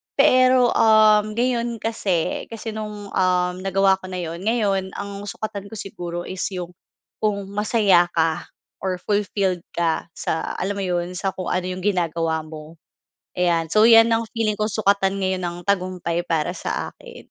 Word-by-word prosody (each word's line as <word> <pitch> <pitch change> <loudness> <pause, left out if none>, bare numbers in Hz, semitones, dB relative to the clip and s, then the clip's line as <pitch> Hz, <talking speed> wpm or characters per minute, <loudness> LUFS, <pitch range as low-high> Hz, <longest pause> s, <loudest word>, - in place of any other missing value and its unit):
Pero, 255 -3 +5
uhm, 215 -1 +5
ngayon 240 -1 0
kasi 195 -7 -1
kasi 225 0 -6
no'ng, 210 -2 -7
uhm, 180 -1 +1
nagawa 195 0 +3
ko 185 - -11
na 185 - -6
'yon 170 0 -5
ngayon, 200 -4 0
ang 200 0 -6
sukatan 205 -1 -5
ko 220 - -10
siguro 175 -4 -6
is 185 0 -4
'yong 180 -1 -5 0.5
kung 205 -2 0
masaya 205 -4 +3
ka 165 +1 0 0.3
or 185 -1 -1
fulfilled 200 -3 0 0.2
ka 165 -2 0
sa 160 - -3
alam 200 +2 -2
mo - - -2
'yon, 175 0 -1
sa 195 -2 -1
kung 185 - -4
ano 180 0 0
'yong 185 0 -5
ginagawa 165 -4 0
mo. 155 +1 -11 0.6
Ayan. 170 -2 +1
So, 215 +1 +5
'yan 225 0 +7
ang 225 0 +1
feeling 215 -2 0
ko 215 - +1
sukatan 200 -2 +1
ngayon 185 -1 -1
ng 175 0 -4
tagumpay 180 -3 -1
para 160 -3 0
sa 180 - -4
akin. 485 -1 -14
195 Hz, 165 wpm, -22 LUFS, 175-215 Hz, 0.6 s, yan